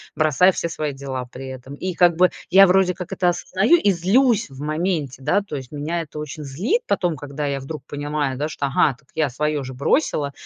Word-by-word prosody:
Бросаю 155 +4 +4
все 170 - -2
свои 150 -3 -3
дела 135 -2 -5
при 135 +1 -8
этом. 130 +1 -9
И 180 +4 -4
как 175 -2 +4
бы 180 +1 +5 0.2
я 195 +1 +8
вроде 185 0 +3
как 180 0 -8
это 180 -2 +2
осознаю 190 - +2
и 205 - +3
злюсь 200 - +2
в 135 +1 -10
моменте, 155 -3 -2
да, 200 - +2
то 195 -7 -7
есть. 130 0 -9
Меня 160 +4 -2
это 150 -1 -8
очень 150 0 -6
злит 190 - -1
потом, 175 - 0
когда 145 +1 -4
я 140 -1 -2
вдруг 150 +3 -7
понимаю, 145 -2 -2
да, 150 - -1
что 145 -2 -3
ага, 135 0 +2
так 140 - -28
я 155 -3 +1
свое 150 +2 -1
же 130 0 -7
бросила, 140 - 0
150 Hz, 220 wpm, -22 LUFS, 140-180 Hz, 0.2 s, я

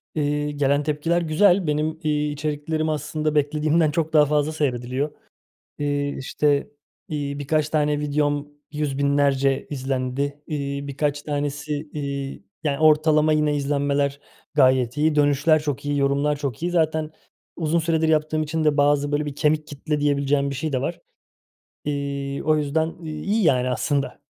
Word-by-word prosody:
Eee, 150 0 0
gelen 145 0 +1
tepkiler 155 +3 0
güzel. 175 +2 +3
Benim, 155 +2 -1
iii, 150 -1 0
içeriklerim 155 +2 -2
aslında 155 0 -2
beklediğimden 150 +2 +2
çok 160 0 -1
daha 150 -1 +6
fazla 150 +1 +1
seyrediliyor. 135 -1 -1 0.7
Eee, 145 -1 0
işte, 145 +2 0 0.4
iii, 145 -2 -3
birkaç 150 +1 0
tane 150 -1 +1
videom 145 0 0 0.2
yüz 150 -2 -2
binlerce 140 -1 +2
izlendi. 135 +1 -2
İii, 140 -2 -3
birkaç 145 +1 -1
tanesi, 145 +1 -3
iii, 140 -5 -5 0.2
yani, 140 -2 0
ortalama 155 0 +4
yine 150 -1 +2
izlenmeler 140 0 0 0.3
gayet 130 -2 +3
iyi. 155 +1 +2
Dönüşler 145 +1 +3
çok 145 -2 -3
iyi, 145 0 0
yorumlar 140 +2 +1
çok 140 -1 -4
iyi. 175 - 0
Zaten 160 -2 +1 0.5
uzun 165 0 +1
süredir 160 -1 +1
yaptığım 155 0 +1
için 155 +1 -2
de 150 -1 +3
bazı, 145 0 +2
böyle, 150 0 0
bir 145 - -4
kemik 155 0 +1
kitle 150 +1 -3
diyebileceğim 140 -1 +1
bir 140 - -4
şey 150 +3 -3
de 130 - 0
var. 170 +6 -3 0.8
İii, 140 -1 -3
o 155 0 +3
yüzden 160 +2 -1
iyi 165 +8 -1
yani 130 -5 +3
aslında. 140 +2 -2
145 Hz, 150 wpm, -23 LUFS, 140-155 Hz, 0.8 s, daha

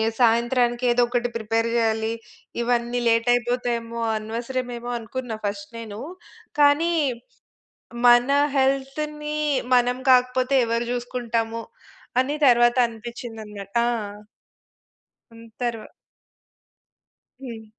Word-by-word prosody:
ఏ - - +1 0.2
సాయంత్రానికి 240 +1 +2
ఏదో 245 0 +3
ఒకటి 245 0 0
ప్రిపేర్ 225 +1 0
జేయాలి. 225 -1 +1 0.5
ఇవన్నీ 240 0 0
లేట్ 230 +1 +2
అయిపోతాయేమో! 240 -1 -2 0.2
అనవసరమేమో 240 +2 -4
అనుకున్నా 235 0 -5
ఫస్ట్ 200 0 -5
నేను. 215 -2 -8 0.6
కానీ 295 +4 +4 1.1
మన 240 +2 +6 0.3
హెల్త్‌ని 300 +3 -1 0.4
మనం 245 0 +3 0.2
కాకపోతే 255 +1 +2
ఎవరు 230 +1 -1
చూసుకుంటాము 235 -2 -2 0.6
అని 280 +3 -1
తరువాత 240 -1 +5
అనిపిచ్చిందన్న 225 -3 -8 0.2
ఆ! - - +1 1.5
హ్మ్. 230 0 -13 0.2
తర్వ్ 230 -3 -2 1.6
హ్మ్. 230 -4 -8
240 Hz, 90 wpm, -23 LUFS, 230-250 Hz, 1.6 s, మన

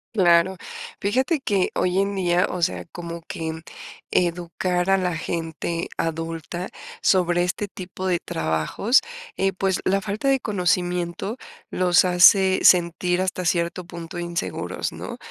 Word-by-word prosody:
Claro. 180 -1 +4 0.4
Fíjate 260 - +1
que, 200 -8 +1
hoy 180 +1 +1
en 200 +1 0
día, 180 -1 +2
o 180 - -3
sea, - - 0
como 170 0 -7
que 160 0 -5 0.5
educar 180 +1 0
a 195 - +5
la 180 -2 -1
gente 165 +1 -3
adulta, 165 +2 -3 0.3
sobre 175 -2 +3
este 190 +3 -2
tipo 185 0 -6
de 180 -2 +2
trabajos, 80 - +1 0.4
eh, 195 0 +1
pues 190 0 0
la 195 +1 +2
falta 210 +7 -3
de 270 -1 +4
conocimiento 180 0 -1 0.3
los 180 0 +3
hace 185 +2 +6
sentir 180 0 +4
hasta 185 -1 -2
cierto 170 +1 0
punto 170 +1 -8
inseguros, 170 - -3
¿no? - - -7
180 Hz, 135 wpm, -23 LUFS, 170-190 Hz, 0.5 s, hace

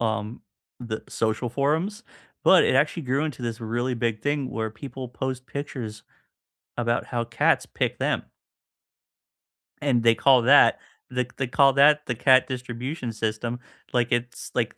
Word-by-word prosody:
um, 110 0 -2 0.4
the 110 -3 -5
social 110 +2 -1
forums, 160 - -1 0.4
but, - - +7
it - - +2
actually 170 - +1
grew 135 +2 0
into 150 -5 -5
this 115 0 -4
really 120 +3 -2
big 115 -2 -2
thing 145 -1 -1
where 110 -1 -3
people 130 +3 -8
post 130 +1 -4
pictures 125 -7 -6 0.8
about 120 0 0
how 120 -1 -2
cats - - +1
pick - - -3
them. - - 0 1.6
And 130 -5 +2
they 115 0 +5
call 130 0 +4
that 140 +4 +6 0.3
the 125 -1 -1
they 135 - 0
call 135 +2 +4
that 150 +2 +5
the 125 - -1
cat 130 +2 +4
distribution 125 +1 -5
system. 110 +2 -3 0.3
Like 120 -1 +1
it's, 120 0 -2
like - - 0
125 Hz, 150 wpm, -25 LUFS, 115-135 Hz, 1.6 s, but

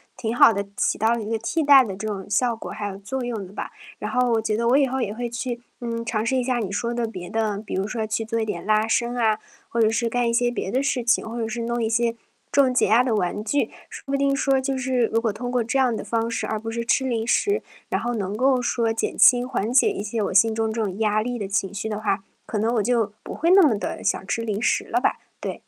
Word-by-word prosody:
挺 225 -1 -3
好 235 - +7
地 200 0 -2
起 - - +1
到 225 +2 +2
了 235 - -2
一 210 - -5
个 225 - 0
替 320 +9 -1
代 280 -3 +7
的 195 -5 -5
这 215 +3 -5
种 195 -3 -4
效 235 +3 +1
果 - - -8
还 205 0 -4
有 195 -1 -6
作 245 +6 -4
用 225 -5 -4
的 185 - -13
吧。 - - -5 0.3
然 - - -4
后 250 -1 +2
我 225 -1 +2
觉 215 -1 -1
得 235 0 0
我 265 - +5
以 275 -2 +3
后 265 +1 -2
也 205 -2 -2
会 240 +1 -4
去， 240 0 -4 0.2
嗯， 230 -1 -3
尝 220 -2 -1
试 265 - +1
一 250 - +1
下 250 -1 0
你 200 -3 -3
说 235 +3 -2
的 235 -1 -1
别 180 -5 -8
的 220 -2 -1
比 215 - -8
如 190 +1 0
说 220 -1 -3
去 220 +1 -1
做 230 0 -2
一 220 - 0
点 185 -4 -4
拉 215 +1 +2
伸 240 +2 0
啊， 220 -2 +2 0.3
或 230 - 0
者 220 - +5
是 230 0 0
干 245 0 0
一 - - -1
些 240 +1 +2
别 215 -5 -4
的 260 +2 +1
事 260 -3 0
情， 235 -1 +1
或 235 - -6
者 225 - -1
是 230 +1 -4
弄 235 0 -1
一 220 - 0
些 230 0 +1 0.4
这 280 - +5
种 255 -1 +1
解 250 - +3
压 230 +4 +5
的 245 -3 0
玩 205 +1 -1
具， 285 +6 0 0.2
说 - - -10
不 275 - 0
定 275 0 +2
说 275 -1 +2
就 265 0 -2
是 255 -2 +1
如 225 +1 0
果 225 -3 0
通 245 +3 -5
过 250 -1 +1
这 240 +4 -1
样 255 -3 +3
的 - - -4
方 230 0 -1
式， - - -2
而 220 - -1
不 225 +1 -5
是 235 0 -3
吃 265 - +2
零 230 -2 -1
食， 410 - +2 0.3
然 - - -1
后 240 +1 -2
能 200 -1 -3
够 260 0 +3
说 230 -2 0
减 225 - -2
轻、 245 0 +6
缓 235 -3 -2
解 260 - +5
一 - - -4
些 215 +1 -3
我 - - -2
心 220 +3 +4
中 220 0 0
这 225 0 -2
种 195 +1 -4
压 215 -1 +2
力 245 +1 -3
的 205 - -4
情 195 0 -1
绪 220 +2 -4
的 210 0 -3
话， 195 -2 -1 0.2
可 215 - -3
能 225 +3 +1
我 215 - +2
就 225 -3 +1
不 - - -7
会 335 +4 +2
那 390 +1 +8
么 255 - +4
地 - - -4
想 190 - 0
吃 230 - -2
零 215 -1 -2
食 - - +1
了 - - 0
吧。 - - +1 0.2
对。 - - -5
230 Hz, 315 characters per minute, -23 LUFS, 215-245 Hz, 0.4 s, 那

